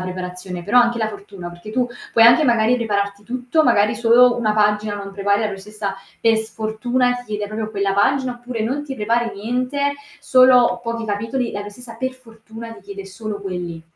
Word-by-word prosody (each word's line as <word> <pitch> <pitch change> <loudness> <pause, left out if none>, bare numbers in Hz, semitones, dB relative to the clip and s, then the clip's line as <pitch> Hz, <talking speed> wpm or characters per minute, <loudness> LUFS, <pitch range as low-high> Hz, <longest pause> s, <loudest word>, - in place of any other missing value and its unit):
preparazione 180 0 -6
però 235 +7 +3
anche 240 0 +2
la 220 -1 0
fortuna, 200 -4 -9
perché 175 +5 -11
tu 250 +2 +1 0.3
puoi 225 - +6
anche 245 +6 +7
magari 235 0 +3
prepararti 200 -3 -2
tutto, 250 +6 0
magari 210 -5 +3
solo 240 +1 +5
una 215 -2 +1
pagina 210 0 +1
non 200 -1 -7
prepari 200 +1 +1
la 215 - +1
professoressa 200 0 -5 0.2
per 225 -1 +3
sfortuna 220 +3 -1
ti 245 0 -7
chiede 210 -1 -3
proprio 215 +1 -4
quella 200 -2 0
pagina, 260 +5 +2
oppure 245 -2 -4
non 265 +6 -1
ti 275 -2 -6
prepari 230 +2 0
niente, 255 +7 -1 0.3
solo 255 -2 +5
pochi 230 -1 -3
capitoli, 225 +4 -2
e - - -10
la 205 - -4
professoressa 225 +3 -10
per 260 +1 -2
fortuna 225 -2 -11
ti - - -13
chiede 195 -1 -9
solo 205 +2 -6
quelli. 175 -3 -5
220 Hz, 190 wpm, -20 LUFS, 205-245 Hz, 0.3 s, anche